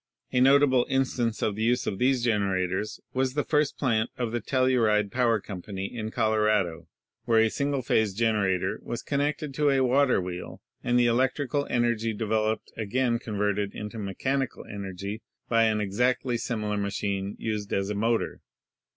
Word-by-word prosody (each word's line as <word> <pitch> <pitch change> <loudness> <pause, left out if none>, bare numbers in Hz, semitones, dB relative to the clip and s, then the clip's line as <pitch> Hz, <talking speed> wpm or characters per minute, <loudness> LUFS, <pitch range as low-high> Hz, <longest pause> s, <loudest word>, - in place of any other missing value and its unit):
A 125 - +2
notable 135 -1 +5
instance 125 -4 0
of 105 - 0
the 110 - -4
use 120 +2 +2
of 95 - -3
these 130 -1 +2
generators 100 -2 0
was 130 0 0
the 145 - +1
first 150 -2 +1
plant 115 -4 +1
of 120 -3 -2
the 120 0 -2
Telluride 115 -5 +2
Power 120 -3 +2
Company 95 0 -6
in 110 -2 -3
Colorado, 105 -7 +1 0.4
where 115 -2 +4
a 110 -1 +3
single 140 -2 -1
phase 110 -4 +1
generator 100 -3 +1
was 120 - -5
connected 145 0 -1
to 150 +1 +2
a 135 -1 +3
water 130 0 +3
wheel 90 -1 -6 0.2
and 125 0 +2
the 120 - +4
electrical 130 +3 +1
energy 115 -2 +1
developed 110 0 -1
again 115 +2 0
converted 105 -2 -1
into 105 +2 -6
mechanical 130 +7 -2
energy 100 +1 -6 0.3
by 115 -1 +4
an 110 -1 +1
exactly 120 +5 0
similar 105 -3 -2
machine 100 0 -2
used 105 -2 -3
as 100 +1 0
a - - 0
motor. 115 +3 0
115 Hz, 160 wpm, -27 LUFS, 105-125 Hz, 0.4 s, notable